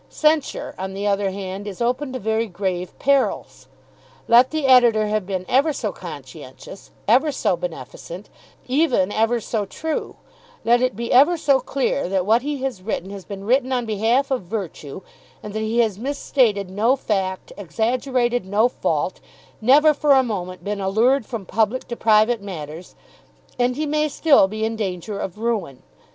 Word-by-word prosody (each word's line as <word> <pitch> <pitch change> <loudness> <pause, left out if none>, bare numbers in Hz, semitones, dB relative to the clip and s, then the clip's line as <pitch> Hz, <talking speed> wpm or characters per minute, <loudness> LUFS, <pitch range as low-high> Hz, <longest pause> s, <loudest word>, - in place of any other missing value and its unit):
Censure 305 -2 0
on 190 0 -5
the 200 +1 -4
other 200 -1 +1
hand 195 +1 -6
is 195 - -7
open 250 +3 -1
to 260 - -4
very 220 0 -1
grave 185 -1 -4
perils. 275 -1 0 0.6
Let 245 +2 +6
the 310 -2 -2
Editor 240 -4 +5
have 210 -2 -1
been 185 -2 -3
ever 280 +5 +3
so - - -3
conscientious, - - -11 0.2
ever 295 +4 +4
so 215 -8 0
beneficent, 170 +2 -8 0.4
even 255 - +2
ever 225 +3 +1
so 215 -2 -3
true, 315 +10 -4 0.5
let 240 +1 +4
it 255 -5 0
be 235 +2 -4
ever 290 +7 +6
so 285 -4 +3
clear 270 -3 -1
that 190 -1 0
what 225 +4 +3
he 285 -1 -4
has 260 -8 -3
written 190 -1 -4
has 195 -2 -9
been 195 -2 -8
written 255 +4 +1
on 250 -2 0
behalf 230 +6 +1
of 260 - 0
virtue, 185 -5 -6 0.4
and 210 - -7
that 215 - -2
he 220 +2 -2
has 215 -4 -1
misstated 245 -6 0
no 225 +7 +2
fact, 190 -7 -3
exaggerated 240 - -1
no 205 +5 +2
fault, 250 - -2 0.4
never 295 +7 +5
for 290 0 +3
a 265 -1 +5
moment 185 -6 -5
been 205 0 -3
allured 225 +6 +2
from 230 -6 -6
public 220 +6 0
to 235 - -3
private 220 0 +3
matters, 165 -3 -8 0.6
and 245 0 +2
he 305 +3 -2
may 305 +1 +1
still 280 -8 +4
be 215 +2 -3
in 225 0 -2
danger 200 -1 -4
of 190 +1 -5
ruin. 215 - -3
225 Hz, 170 wpm, -21 LUFS, 195-260 Hz, 0.6 s, Let